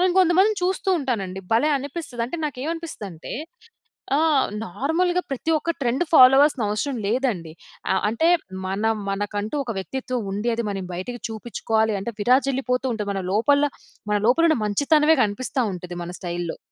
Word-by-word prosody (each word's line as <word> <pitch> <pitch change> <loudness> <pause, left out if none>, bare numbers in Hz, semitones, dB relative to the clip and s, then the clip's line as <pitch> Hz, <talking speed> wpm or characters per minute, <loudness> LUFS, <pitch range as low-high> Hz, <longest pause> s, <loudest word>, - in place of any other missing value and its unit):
నేను 365 0 +3
కొంతమందిని 375 +4 +4
చూస్తూ 375 +1 -1
ఉంటాను 250 -8 -1
అండి 185 +1 -7
భలే! 280 +7 +3
అనిపిస్తది. 275 -3 -5
అంటే 340 - -5
నాకేమనిపిస్తది 305 -3 -4
అంటే, 165 -1 -9 0.9
ఆహ్, 310 -4 +3 0.2
నార్మల్‌గా 325 - 0
ప్రతి 270 +5 -1
ఒక్క 335 - -1
ట్రెండ్ 260 +7 +1
ఫాలో 260 -2 +8
అవల్సిన 285 -4 +3
అవసరం 245 +5 -2
లేదండి. 210 -9 -1 0.4
అహ్, 190 - +1
అంటే, 320 +10 +2 0.4
మన 195 +3 -2 0.3
మనకంటూ 205 +5 -3
ఒక 230 - -3
వ్యక్తిత్వం 255 +5 -3
ఉంది, 210 +4 -1
అది 235 - -2
మనం 195 -2 -4
బయటకి 235 +7 -5
చూపించుకోవాలి 220 -1 -1
అంటే, 235 +4 -4
విరాజిల్లిపోతూ 260 +2 +2
ఉంటది. 210 -2 -3
మన 195 -1 -3
లోపల, 285 +7 +3 0.4
మన 210 - +2
లోపల 295 +8 +4
ఉన్న 310 - +2
మంచితనమే 300 +8 +3
కనిపిస్తా 250 +5 -2
ఉంటది 180 0 -7
మన 175 - -6
స్టైల్‌లో. 175 -1 -4
250 Hz, 155 wpm, -23 LUFS, 205-295 Hz, 0.9 s, ఫాలో